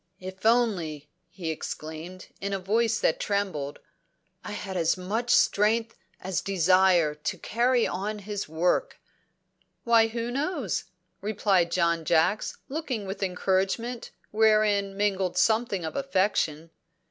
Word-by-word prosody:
"If 190 +3 -4
only," 175 -11 +1 0.2
he 170 -2 -4
exclaimed, 160 +4 -7
in 200 0 -2
a - - +1
voice 220 +4 +1
that 160 - +2
trembled, 190 -9 -2 0.7
"I - - -7
had 195 -2 -5
as 170 0 +1
much 215 +7 -3
strength 225 +2 +3 0.2
as 185 -4 -2
desire 185 -3 +3
to 150 +1 -4
carry 240 +2 +1
on 210 +3 -3
his 205 -3 -5
work!" 175 - 0 0.8
"Why, 230 -1 +5
who 230 +1 -4
knows?" 280 - -2 0.4
replied 195 -4 +1
John 170 -1 +1
Jacks, 170 +6 +1
looking 265 -8 -3
with 195 +1 -6
encouragement 195 +6 -1 0.2
wherein 210 -2 +3
mingled 195 -3 0
something 220 -5 +2
of 160 - -5
affection. 185 - 0
195 Hz, 125 wpm, -27 LUFS, 175-225 Hz, 0.8 s, Why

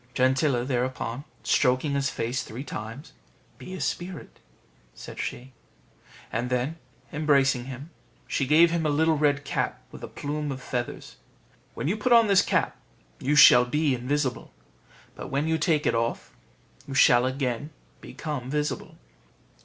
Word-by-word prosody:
Gentilla 130 -1 +2
thereupon 130 0 -2 0.2
stroking 130 +3 +2
his 140 -1 0
face 120 +3 -2
three 120 +5 -7
times, 115 +4 -8 0.5
"Be 185 - -8
a - - -7
spirit," 175 -2 -5 0.6
said - - -10
she; 130 +1 -5 0.8
and 120 +2 -2
then, 130 +6 -1 0.4
embracing 140 -4 +2
him, 135 +5 -8 0.3
she 135 - -1
gave 165 +4 +6
him 170 -1 0
a 155 - +1
little 160 +2 +2
red 145 -1 +1
cap - - -2
with - - -11
a - - -4
plume 150 0 -4
of 135 - -5
feathers. 125 -1 -5 0.6
"When - - -3
you 195 +6 0
put 240 +3 +2
on 230 -1 +7
this 200 -3 +5
cap, - - 0 0.4
you 145 +3 0
shall 125 -4 +9
be 150 +3 +1
invisible; 130 +1 -2 0.6
but - - -8
when 140 +3 -1
you 160 0 +1
take 150 -1 +1
it - - +2
off, 115 0 -2 0.5
you 135 - -6
shall 125 -1 +5
again 130 +1 -2 0.3
become 145 -6 -6
visible." 150 +1 -3
140 Hz, 150 wpm, -26 LUFS, 125-150 Hz, 0.8 s, shall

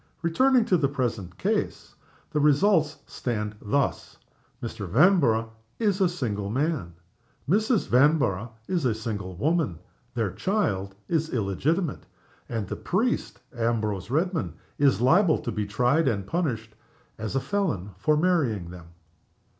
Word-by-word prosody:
Returning 245 +9 +4
to 185 - +3
the 140 - +2
present 115 -10 -3
case, - - -2 0.4
the 150 - 0
results 150 +1 +3
stand 105 -4 -3
thus: 135 +7 -1 0.5
Mr. 110 -4 -5
Vanborough 120 - +4 0.3
is 205 -4 +1
a 185 - +4
single 110 - -3
man; 130 - -1 0.5
Mrs. 215 - +2
Vanborough 125 - +3 0.2
is 180 -4 0
a 120 -4 +1
single 105 -5 -5
woman; 145 - 0 0.4
their 110 -5 0
child 100 - -1
is 160 -1 0
illegitimate, 140 - -1 0.4
and 110 -5 -3
the - - -4
priest, 225 +7 -1
Ambrose 110 -4 -1
Redman, 155 - -1 0.2
is 140 -5 +3
liable 165 +6 +5
to 130 -6 -4
be 105 -2 -2
tried, 125 +10 +2
and 100 -6 0
punished, 115 - -2 0.5
as 110 +3 -4
a - - +3
felon, 130 - -2
for 150 +9 +2
marrying 140 - +1
them." 90 -2 -11
130 Hz, 130 wpm, -26 LUFS, 105-170 Hz, 0.5 s, liable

